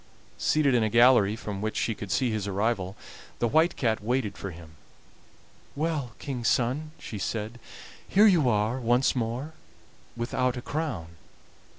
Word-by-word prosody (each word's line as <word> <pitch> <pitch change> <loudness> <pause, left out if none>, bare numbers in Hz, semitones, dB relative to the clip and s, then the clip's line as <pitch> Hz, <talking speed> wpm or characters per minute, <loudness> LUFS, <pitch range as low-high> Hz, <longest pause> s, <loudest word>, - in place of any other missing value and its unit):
Seated 150 -3 +2
in 120 - +3
a 110 - +1
gallery 115 -3 +5
from 105 -3 -6
which 110 0 -2
she 115 - 0
could 105 -2 -8
see 125 -3 +1
his 105 -2 -2
arrival, 100 -1 -1 0.4
the 120 - +1
White 160 +8 +3
Cat 110 -4 0
waited 120 -2 -1
for 100 - -6
him. 85 -2 -11 1.0
"Well, 145 -6 -2
King's 125 -4 -3
son," 130 +6 +1
she 105 - -7
said, 110 +4 -4 0.5
"here 205 +3 +5
you 170 - +5
are 110 +3 +1
once 120 +3 +2
more, 125 +6 -3 0.6
without 125 +1 -1
a - - -4
crown." 105 - -4
120 Hz, 155 wpm, -27 LUFS, 105-135 Hz, 1.0 s, gallery